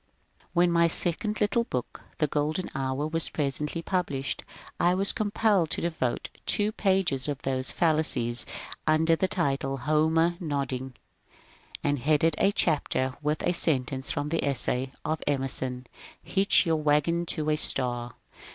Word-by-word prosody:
When 175 Hz, 0 st, +3 dB
my 170 Hz, 0 st, +4 dB
second 180 Hz, +6 st, 0 dB
little 210 Hz, +3 st, +2 dB
book, 125 Hz, -, -5 dB
" -, -, -32 dB
The 155 Hz, -, +2 dB
Golden 150 Hz, +5 st, -2 dB
Hour," 135 Hz, +2 st, -2 dB
was 165 Hz, +1 st, +2 dB
presently 150 Hz, +3 st, -1 dB
published 150 Hz, -8 st, -2 dB, 0.4 s
I 175 Hz, +1 st, +3 dB
was 195 Hz, +1 st, +3 dB
compelled 205 Hz, -5 st, +1 dB
to -, -, -2 dB
devote 160 Hz, -8 st, -2 dB, 0.2 s
two 210 Hz, 0 st, +3 dB
pages 190 Hz, -11 st, +1 dB
to 145 Hz, -, -1 dB
those 130 Hz, -1 st, 0 dB
fallacies 155 Hz, -8 st, +1 dB, 0.4 s
(under 160 Hz, +1 st, +3 dB
the 190 Hz, -, 0 dB
title 135 Hz, -6 st, -1 dB
^^ -, -, -11 dB
Homer 160 Hz, +3 st, +2 dB
Nodding 135 Hz, -5 st, -3 dB, 0.4 s
"), -, -, -17 dB
and 145 Hz, -1 st, 0 dB
headed 155 Hz, +4 st, +2 dB
a 200 Hz, -, +4 dB
chapter 140 Hz, -7 st, +1 dB
with 150 Hz, +1 st, -1 dB
a 175 Hz, -, +1 dB
sentence 135 Hz, -5 st, +1 dB
from 145 Hz, +1 st, -2 dB
the 165 Hz, +1 st, -1 dB
essay 130 Hz, -1 st, -1 dB
of 155 Hz, 0 st, -2 dB
Emerson, 130 Hz, -2 st, -1 dB
*^ -, -, -16 dB
Hitch 195 Hz, 0 st, +3 dB
your 165 Hz, -1 st, +1 dB
wagon 155 Hz, +3 st, +1 dB
to 155 Hz, -1 st, +1 dB
a -, -, +3 dB
star 120 Hz, -4 st, -1 dB
155 Hz, 155 wpm, -27 LUFS, 135-170 Hz, 0.4 s, my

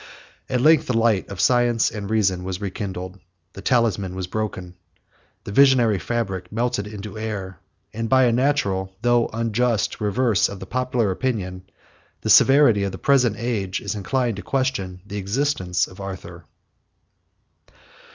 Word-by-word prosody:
At 125 Hz, -2 st, 0 dB
length 155 Hz, +1 st, +5 dB
the 125 Hz, -, 0 dB
light 115 Hz, -4 st, +2 dB
of 100 Hz, -2 st, -8 dB
science 120 Hz, -2 st, +3 dB
and 100 Hz, -2 st, -6 dB
reason 95 Hz, -5 st, +1 dB
was 95 Hz, 0 st, -4 dB
rekindled; 95 Hz, -2 st, -5 dB, 0.3 s
the 100 Hz, -, -9 dB
talisman 105 Hz, -7 st, +1 dB
was 95 Hz, -1 st, -3 dB
broken; 95 Hz, -2 st, -4 dB, 0.7 s
the -, -, -7 dB
visionary 120 Hz, -4 st, +4 dB
fabric 95 Hz, -7 st, -3 dB
melted 115 Hz, -2 st, -1 dB
into 105 Hz, 0 st, -8 dB
air; 100 Hz, -5 st, -5 dB, 0.3 s
and 115 Hz, +1 st, -3 dB
by 130 Hz, 0 st, +5 dB
a 120 Hz, -, +4 dB
natural, 100 Hz, -8 st, 0 dB
though 120 Hz, -1 st, +3 dB
unjust, 115 Hz, -1 st, -1 dB
reverse 110 Hz, 0 st, +2 dB
of 100 Hz, -, -8 dB
the 95 Hz, -, -7 dB
public 125 Hz, 0 st, -1 dB
opinion, 95 Hz, -3 st, -3 dB, 0.6 s
the -, -, +1 dB
severity 135 Hz, -6 st, +6 dB
of 100 Hz, -1 st, -2 dB
the -, -, -5 dB
present 125 Hz, -6 st, +3 dB
age 105 Hz, -5 st, -2 dB
is 100 Hz, -, -4 dB
inclined 115 Hz, +2 st, -1 dB
to -, -, -5 dB
question 130 Hz, -10 st, -2 dB
the 105 Hz, 0 st, -6 dB
existence 100 Hz, -4 st, 0 dB
of 95 Hz, -, -13 dB
Arthur. 90 Hz, -3 st, -8 dB
105 Hz, 150 wpm, -22 LUFS, 95-120 Hz, 0.7 s, severity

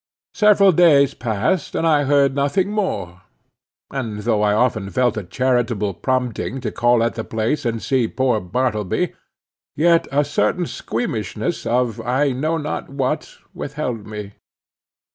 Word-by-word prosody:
Several 205 Hz, -2 st, +5 dB
days 150 Hz, -5 st, +5 dB
passed, 125 Hz, -, -1 dB
and -, -, 0 dB
I 150 Hz, -3 st, +3 dB
heard 140 Hz, -1 st, +3 dB
nothing 145 Hz, +8 st, 0 dB
more; 100 Hz, -, -3 dB, 0.7 s
and 115 Hz, -6 st, -4 dB
though 110 Hz, -1 st, +1 dB
I 105 Hz, -1 st, +3 dB
often 110 Hz, -2 st, +1 dB
felt 125 Hz, +2 st, +1 dB
a 105 Hz, -, -3 dB
charitable 115 Hz, 0 st, 0 dB
prompting 130 Hz, +3 st, -2 dB
to -, -, -3 dB
call 120 Hz, -1 st, +3 dB
at 115 Hz, -, 0 dB
the 110 Hz, -, -4 dB
place 115 Hz, +7 st, -2 dB
and 115 Hz, -1 st, -2 dB
see 130 Hz, -4 st, +1 dB
poor 125 Hz, -2 st, 0 dB
Bartleby, 105 Hz, +1 st, -1 dB, 0.6 s
yet 170 Hz, +2 st, +3 dB
a 145 Hz, +1 st, +2 dB
certain 175 Hz, +4 st, 0 dB
squeamishness 115 Hz, -, -3 dB
of 120 Hz, -1 st, 0 dB
I 130 Hz, +4 st, +1 dB
know 155 Hz, +6 st, -1 dB
not 150 Hz, -1 st, -4 dB
what 140 Hz, +2 st, -3 dB, 0.2 s
withheld 130 Hz, -7 st, -4 dB
me. 105 Hz, -1 st, -7 dB
125 Hz, 145 wpm, -20 LUFS, 110-145 Hz, 0.7 s, Several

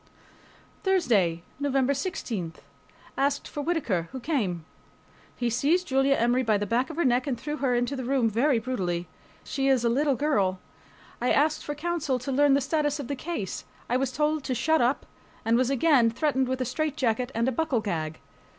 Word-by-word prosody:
THURSDAY, 215 Hz, -, +2 dB, 0.2 s
NOVEMBER 275 Hz, -1 st, +1 dB
16.... 235 Hz, -, -3 dB, 0.7 s
Asked 280 Hz, +1 st, +1 dB
for 295 Hz, -, -5 dB
Whittaker, 250 Hz, -, -1 dB
who 260 Hz, -, -6 dB
came. 215 Hz, -, -1 dB, 0.7 s
He 240 Hz, -, -1 dB
seized 300 Hz, +10 st, +2 dB
Julia 270 Hz, 0 st, +3 dB
Emory 240 Hz, +2 st, +2 dB
by 220 Hz, -4 st, +2 dB
the 205 Hz, -, -2 dB
back 240 Hz, -, 0 dB
of 320 Hz, -, -7 dB
her 340 Hz, -, +1 dB
neck 250 Hz, +2 st, +2 dB
and 250 Hz, -4 st, -2 dB
threw 300 Hz, +4 st, -4 dB
her 260 Hz, -4 st, +1 dB
into 245 Hz, +3 st, 0 dB
the 260 Hz, -, -4 dB
room 255 Hz, -2 st, +2 dB
very 240 Hz, +5 st, +2 dB
brutally. 185 Hz, -8 st, -2 dB, 0.4 s
She 270 Hz, -1 st, -1 dB
is 260 Hz, -3 st, +3 dB
a -, -, +4 dB
little 275 Hz, +3 st, +2 dB
girl. 205 Hz, -11 st, +1 dB, 0.6 s
I 250 Hz, -, +2 dB
asked 305 Hz, +2 st, +2 dB
for 295 Hz, -, -4 dB
counsel 300 Hz, -4 st, -1 dB
to 250 Hz, +2 st, -5 dB
learn 280 Hz, +1 st, +4 dB
the 280 Hz, -, +2 dB
status 295 Hz, +1 st, 0 dB
of 275 Hz, -, -6 dB
the 285 Hz, -, -1 dB
case. 260 Hz, -, -4 dB, 0.3 s
I -, -, +3 dB
was 265 Hz, -1 st, -1 dB
told 300 Hz, +1 st, 0 dB
to 255 Hz, -, -1 dB
"shut 315 Hz, +7 st, +2 dB
up," 245 Hz, +4 st, +1 dB, 0.4 s
and 225 Hz, +1 st, +3 dB
was 250 Hz, +1 st, +2 dB
again 275 Hz, -3 st, +4 dB
threatened 265 Hz, +1 st, 0 dB
with 260 Hz, 0 st, -2 dB
a -, -, 0 dB
straitjacket 255 Hz, -3 st, -1 dB
and 230 Hz, +2 st, +1 dB
a -, -, +2 dB
buckle 280 Hz, -1 st, 0 dB
gag. 160 Hz, -6 st, -3 dB
260 Hz, 190 wpm, -27 LUFS, 235-290 Hz, 0.7 s, a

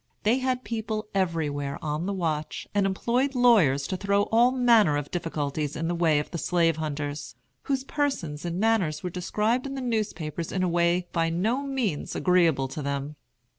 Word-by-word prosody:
They 230 Hz, +5 st, +3 dB
had 255 Hz, -1 st, -1 dB
people 220 Hz, 0 st, -3 dB
everywhere 150 Hz, -7 st, -1 dB
on 155 Hz, +3 st, -3 dB
the -, -, -1 dB
watch, 160 Hz, -5 st, -3 dB
and 200 Hz, -1 st, +2 dB
employed 245 Hz, +8 st, 0 dB
lawyers 195 Hz, -, +4 dB
to 185 Hz, -, -2 dB
throw 200 Hz, +2 st, +1 dB
all 235 Hz, +2 st, +5 dB
manner 235 Hz, -, +4 dB
of 145 Hz, -1 st, -5 dB
difficulties 150 Hz, -3 st, -2 dB
in 165 Hz, +1 st, -2 dB
the 175 Hz, -, 0 dB
way 165 Hz, -3 st, +3 dB
of 145 Hz, -, -2 dB
the 170 Hz, -, -3 dB
slave 165 Hz, -2 st, +2 dB
hunters, 145 Hz, -2 st, -4 dB, 0.3 s
whose 270 Hz, -2 st, 0 dB
persons 270 Hz, -, -2 dB
and 175 Hz, +1 st, -3 dB
manners 195 Hz, -9 st, +1 dB
were 180 Hz, -, -3 dB
described 215 Hz, +8 st, 0 dB
in 275 Hz, -, -5 dB
the -, -, -4 dB
newspapers 175 Hz, -, -3 dB
in 185 Hz, -, -1 dB
a -, -, +2 dB
way 175 Hz, +1 st, +1 dB
by 165 Hz, -1 st, +1 dB
no 215 Hz, +11 st, 0 dB
means 260 Hz, -, -2 dB
agreeable 170 Hz, -7 st, +3 dB
to 150 Hz, -, -5 dB
them. 140 Hz, +1 st, -3 dB
175 Hz, 180 wpm, -26 LUFS, 155-225 Hz, 0.3 s, all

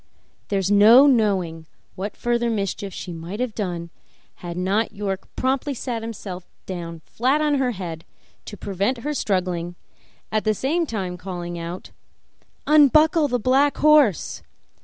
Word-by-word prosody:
There 200 Hz, -, -1 dB
is 195 Hz, 0 st, 0 dB
no 220 Hz, +7 st, +8 dB
knowing 190 Hz, -, +1 dB, 0.3 s
what 200 Hz, +3 st, -6 dB
further 240 Hz, 0 st, 0 dB
mischief 200 Hz, -2 st, -2 dB
she 175 Hz, 0 st, -7 dB
might 170 Hz, +6 st, -7 dB
have 250 Hz, -3 st, -2 dB
done 175 Hz, -5 st, -4 dB, 0.5 s
had 175 Hz, -1 st, -7 dB
not 195 Hz, +5 st, 0 dB
York 195 Hz, -2 st, -4 dB
promptly 265 Hz, +2 st, -1 dB
sat 235 Hz, -2 st, -4 dB
himself 200 Hz, -5 st, -7 dB, 0.2 s
down 170 Hz, -3 st, -6 dB
flat 260 Hz, +6 st, +1 dB
on 300 Hz, -2 st, +1 dB
her 260 Hz, -2 st, +1 dB
head 170 Hz, -5 st, -6 dB, 0.4 s
to 205 Hz, -, -8 dB
prevent 200 Hz, +7 st, -1 dB
her 300 Hz, -, -1 dB
struggling, 180 Hz, -7 st, -1 dB, 0.6 s
at 215 Hz, 0 st, 0 dB
the 215 Hz, -1 st, +1 dB
same 320 Hz, -, 0 dB
time 190 Hz, -6 st, -4 dB
calling 175 Hz, -2 st, -6 dB
out, 170 Hz, +2 st, -7 dB, 0.7 s
"Unbuckle 305 Hz, +2 st, +5 dB
the 250 Hz, -2 st, 0 dB
black 265 Hz, +5 st, +2 dB
horse! 295 Hz, -, +3 dB
205 Hz, 145 wpm, -23 LUFS, 180-255 Hz, 0.7 s, no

